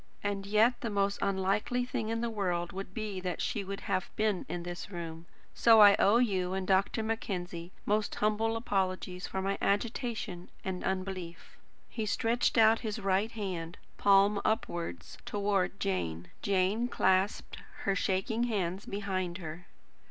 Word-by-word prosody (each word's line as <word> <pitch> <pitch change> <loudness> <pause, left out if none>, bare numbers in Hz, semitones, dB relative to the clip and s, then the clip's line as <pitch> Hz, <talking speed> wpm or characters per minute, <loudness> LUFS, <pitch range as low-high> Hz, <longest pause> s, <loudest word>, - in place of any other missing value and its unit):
And 200 -1 -2
yet 220 +4 +3
the 235 - -2
most 200 -1 0
unlikely 200 +5 0
thing 225 -3 -3
in 230 0 -1
the 235 - 0
world 180 -5 -1
would 195 -1 -6
be 210 -2 -4
that 180 -1 -3
she 205 - -1
should 195 +1 -5
have 185 -2 -1
been 215 -3 0
in 175 - -3
this 175 +2 -6
room. 165 -2 -7 0.3
So 225 -1 +6
I 205 -1 +9
owe 205 +4 +5
you 190 -6 +1
and 190 -1 -2
Dr. 195 +3 +2
Mackenzie 180 -6 -3
most 210 0 0
humble 220 +2 +1
apologies 185 -4 -2
for 190 - -3
my 195 +1 -1
agitation 215 -3 -1 0.2
and 185 -1 -3
unbelief." 185 -2 -4 0.3
He 220 -2 -4
stretched 230 +4 +1
out 225 0 +6
his 215 -3 -3
right 200 +2 +1
hand, 180 -6 -4 0.2
palm 200 +1 +5
upwards, 105 - -2
towards 200 -2 0
Jane. 90 - -2
Jane 200 +4 +1
clasped 190 -3 +1 0.3
her 195 - +2
shaking 195 +5 0
hands 195 -4 -2
behind 190 -3 -2
her. 170 0 -8
195 Hz, 150 wpm, -31 LUFS, 185-215 Hz, 0.3 s, I